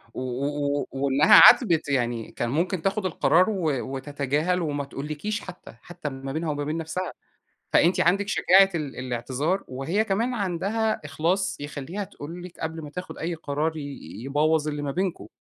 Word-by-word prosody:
و - - -4
و 140 +3 -1
و - - -4
وإنّها 140 +1 +6
عاتبِت 165 - +6
يعني 120 -4 -1
كان 120 - -3
ممكن 170 - 0
تاخد 195 +2 -1
القرار 185 +1 +3
و 185 -7 0 0.2
وتتجاهل 145 +6 -1
وما 145 -3 -2
تقولِكيش 155 +10 -4
حتى، 175 - -11
حتى 175 -3 -8
ال 135 -1 -6
ما 135 - -3
بينها 160 +2 -2
وما 145 0 -3
بين 150 +3 -2
نفسها، 165 +3 -3 0.6
فأنتِ 175 +2 +4
عندِك 200 +4 +2
شجاعة 195 -2 +5
ال 150 -5 -4
الاعتذار، 130 - -2
وهي 160 +12 -1
كمان 225 +5 0
عندها 205 +3 -1
إخلاص 165 +6 -1
يخلّيها 150 +7 -5
تقول 170 +1 -9
لِك 180 -1 -11
قبل 160 0 -4
ما 150 - -8
تاخد 180 +3 -7
أي 170 +1 -2
قرار 155 +1 -2
ي 155 - -5 0.4
يبوّظ 150 +2 +1
اللي 145 -1 -3
ما 145 - -2
بينكم. 180 - -2
160 Hz, 170 wpm, -25 LUFS, 145-185 Hz, 0.6 s, وإنّها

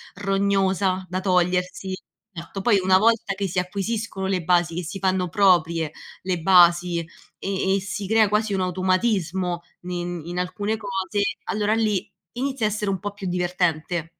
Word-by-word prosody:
rognosa 195 -1 +1
da 185 +1 -2
togliersi. 180 0 0 0.4
Certo, 170 +4 -6
poi 205 0 +3
una 185 0 +5
volta 225 -1 +2
che 195 0 -2
si 180 +1 -1
acquisiscono 200 +2 -3
le 185 -3 -1
basi, 175 -1 +2
che 180 - -3
si 180 +4 -6
fanno 185 -1 0
proprie 170 -5 +3 0.3
le 180 -2 -1
basi, 175 -1 +5 0.4
e 190 0 0
e - - +1
si 195 0 -5
crea 220 0 +4
quasi 210 0 0
un 190 - 0
automatismo 185 -1 0 0.2
ne 180 0 -6
in 175 0 -5
alcune 205 +4 -2
cose, 200 -1 -2 0.2
allora 210 +1 0
lì 215 -4 0 0.2
inizia 260 -2 -2
a - - +3
essere 210 -1 -2
un 190 -2 -1
po' 205 +1 -5
più 195 -2 -6
divertente 175 -2 -1
190 Hz, 160 wpm, -23 LUFS, 180-200 Hz, 0.4 s, una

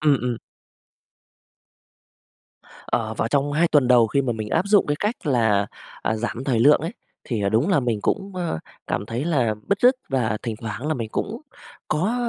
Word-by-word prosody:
Ừm. 150 -2 +4
ừm. 125 -2 -1 2.5
Ờ, 110 -2 -1
vào 110 - -1
trong 145 +1 +1
2 165 +3 +3
tuần 140 -4 +3
đầu 120 -3 +6
khi 140 +5 +1
mà 125 -2 0
mình 110 -1 -5
áp 185 - +1
dụng 205 -1 +5
cái 145 0 0
cách 210 -3 -2
là, 110 -7 +2 0.4
à, 110 - 0
giảm 120 +3 -4
thời 120 -5 +1
lượng 145 +4 +6
ấy 165 +6 -4 0.3
thì 115 -5 -2
là 100 - +2
đúng 115 - +2
là 185 -7 +3
mình 120 -4 0
cũng, 195 - -1
ơ, 170 - -2 0.3
cảm 105 - -2
thấy 120 +6 -3
là 130 -10 +1
bứt 200 +1 +1
rứt 250 +2 +6
và 115 -5 0
thỉnh 115 -3 -3
thoảng 115 +5 -5
là 155 - +1
mình 115 -3 -4
cũng 225 +6 -3 0.5
có 180 +10 +1
130 Hz, 195 wpm, -23 LUFS, 115-155 Hz, 2.5 s, đầu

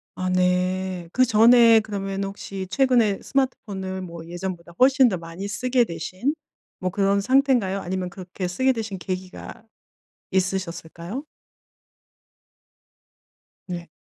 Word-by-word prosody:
아 185 0 -2
네. 185 0 0
그전에 230 -1 +6
그러면은 195 -2 -3
혹시 195 -1 -7
최근에 240 -5 +2
스마트폰을 200 -8 -2
뭐 170 -2 -8
예전보다 175 0 -6
훨씬 265 0 +6
더 185 - -2
많이 165 +4 -7
쓰게 250 +4 +1
되신 185 - -3 0.5
뭐 185 - -1
그런 200 +2 +1
상태인가요? 250 -5 +2
아니면 185 -1 -3
그렇게 185 0 -6
쓰게 260 +9 +2
되신 220 -4 -4
계기가 185 +4 -6 0.7
있으셨을까요? 185 - -3 2.4
네. 175 -2 -6
190 Hz, 260 characters per minute, -24 LUFS, 180-230 Hz, 2.4 s, 그전에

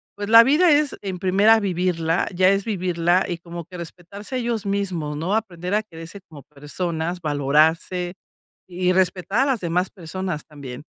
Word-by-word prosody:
pues, 205 0 -5
la 230 +1 +9
vida 310 +6 +4
es 295 -1 +2
en 190 -3 -5
primera 200 +4 +4
vivirla, 175 -4 0
ya 185 +1 +4
es 195 +1 +1
vivirla 180 -3 +1
y 175 - -3
como 170 -1 -8
que 180 -1 -11
respetarse 185 +8 -8
ellos 235 -4 -2
mismos, 185 -7 -2
¿no?, 180 +7 -1
aprender 180 -3 -3
a 215 - +1
quererse 165 0 -10
como 150 -3 -12
personas, 160 +4 -4
valorarse 160 +5 +1 0.5
y 180 0 0
respetar 190 +4 +1
a 275 - +3
las 260 -5 0
demás 180 +2 0
personas 180 -3 -5
también. 140 -3 -9
180 Hz, 165 wpm, -22 LUFS, 165-200 Hz, 0.5 s, la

